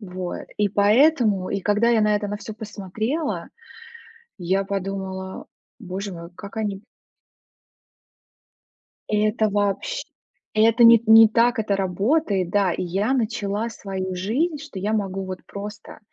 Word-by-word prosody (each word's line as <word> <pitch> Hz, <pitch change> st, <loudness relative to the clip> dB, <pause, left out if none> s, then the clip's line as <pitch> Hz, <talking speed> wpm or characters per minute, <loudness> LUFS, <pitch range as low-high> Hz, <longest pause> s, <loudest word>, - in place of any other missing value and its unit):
Вот 185 Hz, -3 st, -6 dB
и 205 Hz, -1 st, +2 dB
поэтому, 210 Hz, -1 st, +3 dB
и 200 Hz, -, -1 dB
когда 210 Hz, +4 st, +2 dB
я 230 Hz, -2 st, +3 dB
на 210 Hz, 0 st, +3 dB
это 205 Hz, 0 st, -1 dB
на 205 Hz, -, -3 dB
всё 215 Hz, +1 st, -8 dB
посмотрела, 220 Hz, -, -4 dB, 0.9 s
я 190 Hz, +1 st, 0 dB
подумала: 190 Hz, -1 st, -5 dB, 0.3 s
"Боже 195 Hz, -1 st, -5 dB
мой, 170 Hz, 0 st, -9 dB
как 200 Hz, +3 st, -10 dB
они". 210 Hz, -3 st, -2 dB, 2.3 s
Это 215 Hz, +1 st, +1 dB
вообщ 200 Hz, -1 st, -1 dB, 0.5 s
это 225 Hz, +2 st, +5 dB
не 230 Hz, -1 st, +8 dB
не 225 Hz, 0 st, +9 dB
так 230 Hz, +2 st, +2 dB
это 205 Hz, -2 st, 0 dB
работает, 195 Hz, -, 0 dB
да. 195 Hz, -3 st, +2 dB
И -, -, -3 dB
я 195 Hz, +7 st, -1 dB
начала 215 Hz, -2 st, -1 dB
свою 190 Hz, -4 st, -5 dB
жизнь, 260 Hz, -, -1 dB
что 295 Hz, -9 st, -9 dB
я 205 Hz, +3 st, -1 dB
могу 195 Hz, -3 st, -2 dB
вот 185 Hz, -1 st, -6 dB
просто, 205 Hz, +1 st, -9 dB
205 Hz, 135 wpm, -23 LUFS, 190-220 Hz, 2.3 s, не